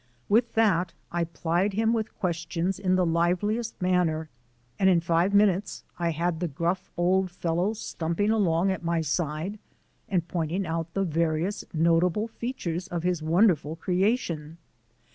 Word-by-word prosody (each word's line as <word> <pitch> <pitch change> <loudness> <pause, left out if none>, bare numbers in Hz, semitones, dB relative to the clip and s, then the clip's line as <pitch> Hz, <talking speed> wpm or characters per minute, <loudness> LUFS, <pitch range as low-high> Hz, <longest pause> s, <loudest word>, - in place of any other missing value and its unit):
With 230 +3 +3
that 185 -6 +2 0.2
I 170 0 0
plied 170 +4 -1
him 225 +3 +2
with 220 -2 -3
questions 170 0 -2
in 185 -1 +2
the 185 -1 +3
liveliest 180 +7 0
manner, 175 -4 +1 0.5
and 190 - +5
in 180 -2 +5
five 170 +3 +1
minutes 200 -1 +2 0.2
I 170 -1 +1
had 165 +1 -1
the 175 - -1
gruff 170 +5 -2
old 185 +2 +2
fellow 175 +3 -1
stumping 205 -1 -1
along 190 -4 +2
at 190 - -4
my 170 0 +1
side 160 +5 -2 0.5
and 175 -4 0
pointing 175 +2 -2
out 165 0 -3
the 195 - +1
various 165 +2 0
notable 170 +5 +2
features 195 -7 -4
of 175 -3 -4
his 180 -2 0
wonderful 160 -2 +2
creation. 180 -4 -1
175 Hz, 145 wpm, -27 LUFS, 165-195 Hz, 0.5 s, and